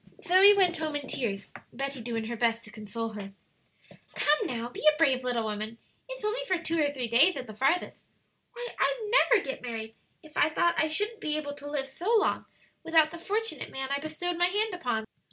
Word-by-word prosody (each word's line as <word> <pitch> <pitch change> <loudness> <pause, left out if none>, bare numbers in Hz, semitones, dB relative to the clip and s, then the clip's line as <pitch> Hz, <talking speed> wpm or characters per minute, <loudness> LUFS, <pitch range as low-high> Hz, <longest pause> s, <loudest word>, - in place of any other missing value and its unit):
Zoe 390 +2 +7
went 360 -3 +3
home 310 -2 -3
in 290 -1 -3
tears, 200 -7 -4 0.2
Betty 275 0 -4
doing 225 -1 -3
her 235 +1 -4
best 230 0 0
to 215 - -11
console 225 +1 -5
her. 205 -2 -8 0.8
"Come, 295 +1 +2
now, 235 -2 -3
be 245 - -9
a 300 - -7
brave 270 -5 +3
little 245 -2 0
woman; 215 +1 -4 0.3
it's - - -7
for 425 - -1
only 470 +4 -2 0.2
two 325 0 +1
or 290 -1 +2
three 255 -4 -3
days 280 +11 +5
at 255 - -5
the 215 - -10
farthest. 275 +11 0 0.5
Why, 485 0 -6
I'd 445 -4 0
never - - +4
get 270 - -5
married 225 -2 -5 0.3
if 310 -1 -16
I 305 - +4
thought 345 +2 +2
I 315 - +2
shouldn't 415 +8 -2
be 305 -3 -1
able 290 -2 -4
to 290 0 -9
live 280 -2 -2
so 345 +10 -3
long 420 - +1 0.4
without 320 -1 +4
the 340 - -8
fortunate 435 +6 -2
man 265 0 -4
I - - -2
bestowed 325 +4 -3
my 350 - +5
hand 420 +3 0
upon." 245 -10 -2
290 Hz, 210 wpm, -28 LUFS, 235-355 Hz, 0.8 s, Zoe